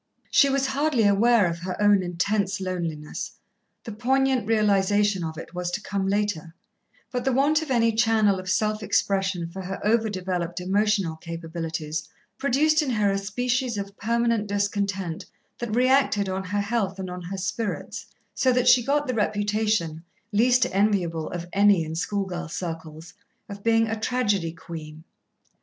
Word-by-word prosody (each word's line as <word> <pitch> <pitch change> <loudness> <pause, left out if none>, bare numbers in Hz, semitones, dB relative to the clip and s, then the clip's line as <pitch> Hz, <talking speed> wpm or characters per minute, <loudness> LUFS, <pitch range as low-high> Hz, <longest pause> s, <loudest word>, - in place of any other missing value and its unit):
She 280 - +5
was 275 0 +1
hardly 270 -3 +1
aware 210 +2 +4
of 170 -1 -2
her 185 +2 -5
own 205 -1 +5
intense 185 +3 -1
loneliness 170 -5 -4 0.5
the 230 - -7
poignant 260 +1 +1
realization 205 -2 +2
of 160 -1 -5
it 165 - -9
was 180 0 -3
to 175 - -2
come 200 -2 -2
later 195 -5 -1 0.6
but 250 -1 -2
the 265 - +1
want 285 +5 +3
of 315 - -6
any 230 -3 +3
channel 220 -3 +3
of 185 0 -6
self 215 +3 +1
expression 195 -3 0
for 190 +3 -7
her 190 +1 -5
over 220 +1 +2
developed 180 -3 -3
emotional 195 -2 +1
capabilities 160 -2 -5 0.3
produced 300 +4 +3
in 295 - -2
her 210 -4 +2
a 195 - 0
species 240 +3 -1
of 200 0 -5
permanent 230 0 0
discontent 200 -4 -2 0.3
that 235 -3 -3
reacted 255 -5 +3
on 190 0 -3
her 205 +2 -1
health 200 -2 -1
and 185 -1 -5
on 180 0 -6
her 185 +3 -6
spirits, 200 +3 -4 0.3
so 260 -2 +2
that 250 0 +1
she 245 - +6
got 290 +3 +1
the 255 - -2
reputation, 210 -6 0 0.3
least 245 +4 +4
enviable 185 -5 +1
of 175 -1 -5
any 200 -3 +4
in 160 - -6
schoolgirl 180 0 -3
circles, 165 -1 -6 0.3
of 200 -1 -8
being 225 0 +3
"a 225 0 -3
tragedy 210 -7 0
queen." 160 -2 -9
200 Hz, 160 wpm, -25 LUFS, 180-230 Hz, 0.6 s, she